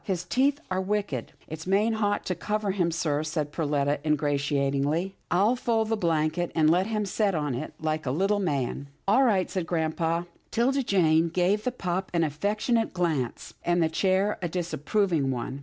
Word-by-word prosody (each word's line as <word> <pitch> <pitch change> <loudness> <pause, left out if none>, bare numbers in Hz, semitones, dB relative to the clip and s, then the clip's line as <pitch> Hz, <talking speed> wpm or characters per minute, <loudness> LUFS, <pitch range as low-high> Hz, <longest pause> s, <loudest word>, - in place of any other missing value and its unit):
His 185 -4 -2
teeth 275 - +1
are 185 0 +1
wicked." 195 - -2
" - - -29
It's 160 +2 -7
main 205 +4 +3
hot 205 -2 0
to 185 - 0
cover 210 +3 -2
him, 180 -3 +1
sir," 155 -3 0
said 155 -1 -2
Perletta 145 -2 0
ingratiatingly. 145 +3 0
" - - -44
I'll 200 +7 +3
fold 225 -3 0
the 225 - +2
blanket 165 -2 0
and 155 -1 +4
let 180 +3 +2
him 215 -2 -1
set 200 0 0
on 150 -3 -1
it, 130 +6 -5
like 155 -2 -2
a - - +2
little 195 +9 +1
man." 140 -6 -2
" - - -41
All 215 +7 +5
right," 200 -7 +3
said 180 -4 -3
grampa. 165 0 0 0.2
'Tilda 260 +4 +1
Jane 165 -7 +3
gave 185 +5 +1
the 250 - +1
pup 190 -5 -3
an 165 - +3
affectionate 210 - 0
glance, 155 -9 -1
and 175 0 +2
the 160 - +2
chair 190 +4 +1
a 175 - -2
disapproving 175 -2 0
one. 130 +1 -3
175 Hz, 190 wpm, -27 LUFS, 155-205 Hz, 0.2 s, All